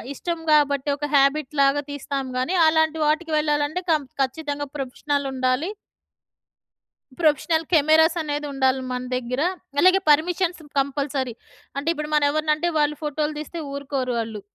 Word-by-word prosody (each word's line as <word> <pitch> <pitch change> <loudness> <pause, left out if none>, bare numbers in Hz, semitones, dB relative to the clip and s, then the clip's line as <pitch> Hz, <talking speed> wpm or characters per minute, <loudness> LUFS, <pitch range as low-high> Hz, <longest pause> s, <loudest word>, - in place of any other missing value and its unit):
ఇష్టం 340 +2 -3
కాబట్టి 285 -1 +2
ఒక 295 +1 -3
హ్యాబిట్‌ 275 +1 +3
లాగా 275 +1 +3
తీస్తాం 280 -1 -4
గానీ, 280 +9 0
అలాంటి 315 0 +2
వాటికి 315 +1 0
వెళ్ళాలంటే 300 +3 0
కం 305 -2 +2 0.2
ఖచ్చితంగా 290 +1 -4
ప్రొఫెషనల్ 280 +1 -2
ఉండాలి. 255 +7 0 1.5
ప్రొఫెషనల్ 320 +1 +2
కెమెరాస్ 320 +2 +5
అనేది 295 -1 -3
ఉండాలి 265 -1 +1
మన 250 0 -3
దగ్గర. 250 +2 -2 0.4
అలాగే 370 +4 +6
పర్మిషన్స్ 345 +3 +2 0.2
కంపల్సరీ. 275 -2 -2 0.4
అంటే 280 +3 -4
ఇప్పుడు 300 -2 -5
మనం 300 -1 +4
ఎవరినంటే 310 +2 0
వాళ్ళు 300 0 +2
ఫోటోలు 300 +1 -1
తీస్తే 320 +2 -6
ఊరుకోరు 275 -3 -3
వాళ్ళు. 220 -2 -4
295 Hz, 130 wpm, -23 LUFS, 275-315 Hz, 1.5 s, అలాగే